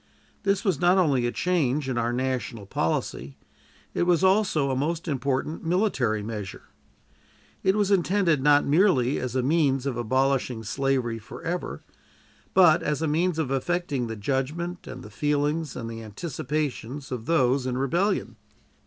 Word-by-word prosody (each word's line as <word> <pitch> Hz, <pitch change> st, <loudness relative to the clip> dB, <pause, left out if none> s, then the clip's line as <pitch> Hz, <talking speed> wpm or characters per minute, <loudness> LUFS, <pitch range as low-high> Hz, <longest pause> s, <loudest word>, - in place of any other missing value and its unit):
This 195 Hz, 0 st, +1 dB
was 185 Hz, -8 st, +1 dB
not 175 Hz, +2 st, +5 dB
only 140 Hz, -9 st, +2 dB
a -, -, -1 dB
change 150 Hz, -6 st, 0 dB
in 130 Hz, -, -1 dB
our 120 Hz, 0 st, 0 dB
national 125 Hz, -3 st, -2 dB
policy, 70 Hz, -6 st, -2 dB, 0.6 s
it -, -, -1 dB
was 175 Hz, 0 st, +3 dB
also 190 Hz, -8 st, +3 dB
a -, -, 0 dB
most 165 Hz, +6 st, -2 dB
important 140 Hz, +2 st, -2 dB
military 160 Hz, -, +1 dB
measure. 105 Hz, -3 st, -6 dB, 1.0 s
It 190 Hz, +1 st, +2 dB
was 205 Hz, -1 st, +1 dB
intended 180 Hz, -5 st, +2 dB
not 145 Hz, +1 st, +5 dB
merely 145 Hz, -5 st, +3 dB
as 125 Hz, -1 st, -4 dB
a 130 Hz, -, +1 dB
means 140 Hz, -2 st, +2 dB
of 135 Hz, -4 st, -2 dB
abolishing 130 Hz, 0 st, 0 dB
slavery 130 Hz, -1 st, -1 dB
forever, 165 Hz, -, -5 dB, 0.7 s
but 175 Hz, -5 st, +6 dB
as 150 Hz, 0 st, -1 dB
a -, -, +1 dB
means 165 Hz, +3 st, +1 dB
of 155 Hz, -5 st, -1 dB
affecting 140 Hz, -2 st, -1 dB
the 110 Hz, -, -5 dB
judgment 145 Hz, -, -3 dB
and 125 Hz, 0 st, -8 dB
the 105 Hz, -, -11 dB
feelings 150 Hz, +4 st, -1 dB
and 115 Hz, -2 st, -5 dB
the 115 Hz, 0 st, -6 dB
anticipations 135 Hz, -, -4 dB
of 120 Hz, -3 st, -5 dB
those 130 Hz, -5 st, +2 dB
in 125 Hz, -1 st, -2 dB
rebellion. 170 Hz, +10 st, 0 dB
140 Hz, 155 wpm, -26 LUFS, 125-170 Hz, 1.0 s, but